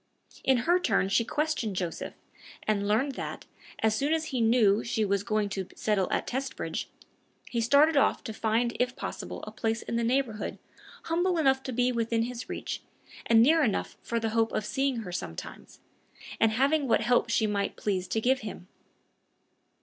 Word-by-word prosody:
In 265 -1 +4
her 350 +2 +4
turn 195 - +1
she 230 - +3
questioned 290 -6 -1
Joseph, 175 -2 -4 0.5
and 200 -2 +1
learned 235 +7 +2
that, 265 - -6 0.4
as 220 -1 +4
soon 285 +7 +1
as 320 0 0
he 250 - +1
knew 225 -2 +4
she 220 -2 0
was 200 -1 +1
going 215 -1 0
to 190 -2 -4
settle 205 -3 0
at - - 0
Testbridge, 265 +1 -3 0.6
he 235 - 0
started 285 +7 +5
off 275 - +3
to 220 - -5
find 230 +2 0
if 250 0 +1
possible - - -6
a - - -7
place 225 0 -2
in 230 - -2
the 235 - 0
neighborhood 240 -2 -1 0.5
humble 350 +2 +1
enough 270 -4 +3
to 260 - -5
be 250 +1 +2
within 230 -1 0
his 240 0 -6
reach, - - -4 0.5
and 225 -1 +6
near 320 +5 +5
enough 220 -7 -1
for 235 - -2
the 225 -1 -1
hope 225 0 +1
of 215 - -1
seeing 270 0 0
her 180 - -6
sometimes, 85 - -7 0.6
and 225 -1 +4
having 280 +4 +2
what 225 - +3
help 240 0 +2
she 225 -1 +2
might 205 -1 -1
please 190 -3 -2
to 225 - 0
give 260 +4 +2
him. 205 -4 -8
230 Hz, 180 wpm, -28 LUFS, 215-265 Hz, 0.6 s, and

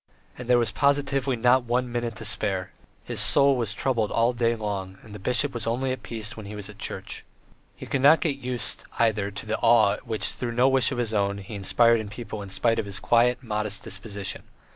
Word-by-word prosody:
And 125 - -9
there 125 0 +5
was 115 -3 +2
positively 140 0 +1
not 125 +2 +3
one 125 +1 -1
minute 120 -2 -3
to 115 0 -7
spare; 95 -3 0 0.3
his - - -4
soul 140 -1 +5
was 115 -4 -2
troubled 115 0 0
all 115 +2 +2
day 120 -1 +1
long, 100 -3 -4
and 105 - -13
the 105 - -8
bishop 125 +7 +1
was 120 -2 -2
only 130 +3 0
at 130 -2 -4
peace 110 -2 -4
when 110 -2 -9
he 105 - -7
was 105 -2 -5
in - - -13
church. - - -5 0.5
He - - -9
could 135 - -1
not 145 +4 +7
get 145 -5 -1
used, 125 -2 -4
either, 110 -3 +1
to 100 - -8
the 110 0 -2
awe 115 -3 +4
which, 110 -4 -1
through 120 -2 -4
no 125 +2 +4
wish 135 -2 +3
of 135 - -3
his 115 -2 -1
own, 100 -1 0
he 100 +2 -9
inspired 115 +4 +3
in 110 -2 -6
people 105 -1 -7
in 100 - -8
spite 105 +5 +1
of - - -2
his 100 - -5
quiet, 120 +2 +2
modest 105 -2 -3
disposition. 100 0 -5
115 Hz, 225 wpm, -25 LUFS, 105-125 Hz, 0.5 s, not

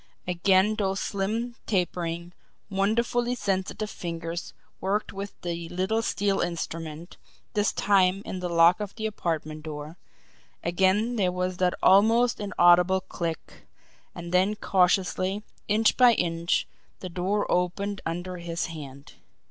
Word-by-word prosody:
Again 190 +3 +3
those 195 -2 0
slim, 220 +5 -2
tapering, 175 -3 -2 0.4
wonderfully 235 +5 +1
sensitive 195 0 -2
fingers 170 0 -5 0.2
worked 200 +3 -1
with 200 +1 -7
the 170 -1 -4
little 190 +5 0
steel 200 -3 0
instrument, 165 -1 -4 0.4
this 205 -1 +2
time 195 -1 +2
in 185 - -5
the 180 -1 -3
lock 170 +2 +5
of 205 -2 -5
the 220 - -4
apartment 160 -7 -3
door 155 +1 -7 0.6
again 190 +7 +2
there 185 -4 +2
was 180 0 -2
that 180 -1 +1
almost 225 +5 +5
inaudible 180 -2 +4
click 170 -3 -6 0.5
and 170 0 -7
then 190 +4 +3
cautiously, 190 +1 +1 0.2
inch 215 +1 +3
by 250 -2 +7
inch, 170 -1 0 0.3
the 185 - -6
door 185 +4 -1
opened 190 +3 -1
under 175 +2 -4
his 170 -1 -3
hand. 140 -3 -10
185 Hz, 125 wpm, -26 LUFS, 170-205 Hz, 0.6 s, by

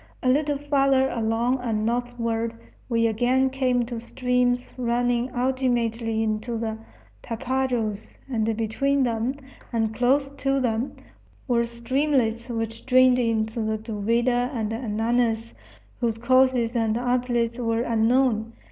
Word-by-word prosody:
A 255 - +3
little 290 +2 +2
farther 275 -2 +2
along 235 +3 0
and 220 -3 -1
northward 230 -1 -1 0.3
we 230 -1 +2
again 250 +4 +2
came 255 -2 +1
to 235 -1 -5
streams 250 0 0
running 245 0 0
ultimately 240 -3 0
into 220 +2 -2
the 220 -1 -3 0.4
Tapajos; 240 -3 -2
and 225 -4 -1
between 275 +5 +1
them, 235 +2 -1 0.4
and 225 -2 0
close 270 +4 +2
to 275 0 +1
them, 240 0 -1 0.5
were 235 -2 +2
streamlets 235 -1 0
which 225 -1 -4
drained 255 -1 +5
into 225 -1 0
the 220 0 -1
Duvida 235 +3 0
and 225 -4 -2
Ananas, 230 0 0 0.5
whose 230 -2 0
courses 255 0 +3
and 225 -1 +1
outlets 245 -1 0
were 230 -1 0
unknown. 230 0 +2
240 Hz, 120 wpm, -25 LUFS, 225-255 Hz, 0.5 s, drained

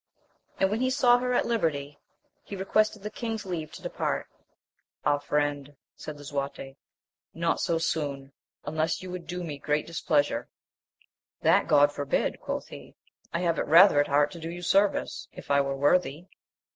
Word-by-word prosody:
And 190 0 +2
when 220 +3 -1
he 255 - +2
saw 250 -2 +4
her 250 0 -1
at - - +2
liberty, 150 -10 -1 0.4
he 200 - -7
requested 210 +2 +1
the 210 - -5
king's 225 -3 -4
leave 165 -5 -4
to - - -11
depart. - - -2 0.8
Ah, 145 - +3
friend, 145 -1 -1 0.2
said 155 -1 -8
Lisuarte, 140 -1 -5 0.6
not 165 0 0
so 165 - +1
soon, 145 -4 -2 0.3
unless 155 +4 -1
you 185 - -7
would 180 -2 -7
do 180 0 -4
me 150 -4 -6
great 150 +1 0
displeasure. 145 -6 0 0.9
That - - +4
God 145 -1 +5
forbid! 145 -1 -1
quoth - - -4
he; - - -12 0.4
I 170 - -2
have 170 -2 +1
it - - -1
rather 170 0 +7
at 145 - +3
heart 145 +1 +3
to 170 - -9
do 165 0 -5
you 175 +1 -7
service, 195 +3 +1
if - - -8
I 140 0 +5
were 135 0 -2
worthy. 145 +2 +2
160 Hz, 170 wpm, -27 LUFS, 145-185 Hz, 0.9 s, rather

